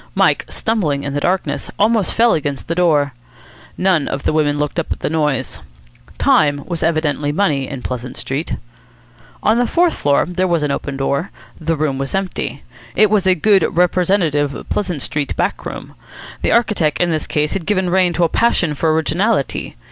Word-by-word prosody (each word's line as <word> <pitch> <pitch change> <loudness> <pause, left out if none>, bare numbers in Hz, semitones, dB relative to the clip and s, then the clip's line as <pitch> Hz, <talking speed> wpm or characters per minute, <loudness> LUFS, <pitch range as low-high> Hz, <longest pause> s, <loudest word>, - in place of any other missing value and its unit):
Mike, - - +2
stumbling 165 -11 -1
in 140 - -4
the 145 - 0
darkness, 165 -3 -1
almost 215 -1 +2
fell 235 +1 +4
against 145 -3 -3
the 165 - -1
door. 155 -6 +2 0.6
None 180 -5 +2
of 135 - -3
the - - +1
women 145 -2 +1
looked 150 +3 -1
up 165 - -4
at - - -3
the - - -1
noise. 150 - -1 0.6
Time 145 -1 +3
was 170 -3 -4
evidently 155 -3 0
money 145 -6 0
in 135 -3 -6
Pleasant 125 0 -5
Street. 140 +5 -3 0.9
On 220 +3 +3
the 245 - +2
fourth 345 +4 +2
floor 140 -1 +2
there 185 +1 0
was 170 -3 +1
an 145 - 0
open 140 0 -3
door. 140 +6 -1 0.3
The 165 0 -1
room 145 -3 -1
was 135 +6 -3
empty. 195 -1 -3 0.3
It 215 -1 +4
was 200 -3 +2
a 185 - +5
good 195 +1 +3
representative 175 -5 +1
Pleasant 180 -9 -2
Street 150 -2 -2
back - - -1
room. - - -8 0.5
The - - +1
architect 210 -10 +2
in 175 -1 +2
this 155 -1 -2
case 150 0 0
had 175 - -4
given 190 -4 +1
rein 185 -1 +3
to 175 +2 +1
a - - +5
passion 180 -5 +1
for 155 +2 +1
originality. 165 +2 0
160 Hz, 185 wpm, -18 LUFS, 145-190 Hz, 0.9 s, a